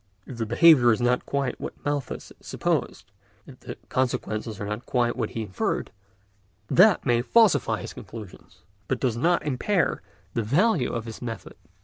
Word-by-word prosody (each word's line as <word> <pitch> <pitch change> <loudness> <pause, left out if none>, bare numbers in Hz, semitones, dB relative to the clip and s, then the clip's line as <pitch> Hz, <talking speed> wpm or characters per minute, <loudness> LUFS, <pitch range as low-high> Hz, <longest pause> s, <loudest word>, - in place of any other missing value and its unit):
If 130 - -9
the 115 - -2
behaviour 120 0 +6
is 110 - +1
not 125 +1 +1
quite 140 -1 -2
what - - -6
Malthus 145 -3 -3
supposed, - - -2 0.3
if 130 -2 -14
the - - -8
consequences 110 -4 -2
are 105 - -4
not 105 +4 -5
quite 120 -2 +1
what 115 -4 -2
he 115 - -4
inferred, 95 -3 -2 0.8
that 195 +1 +5
may 120 -3 +2
falsify 195 - +3
his - - -7
conclusions, 100 -4 -11 0.3
but 130 - -1
does 125 -4 0
not 170 +9 +1
impair 165 +7 0 0.3
the 115 - 0
value 150 - +2
of 115 -1 -4
his 115 -1 -8
method. 115 -2 -6
125 Hz, 160 wpm, -25 LUFS, 115-145 Hz, 0.8 s, behaviour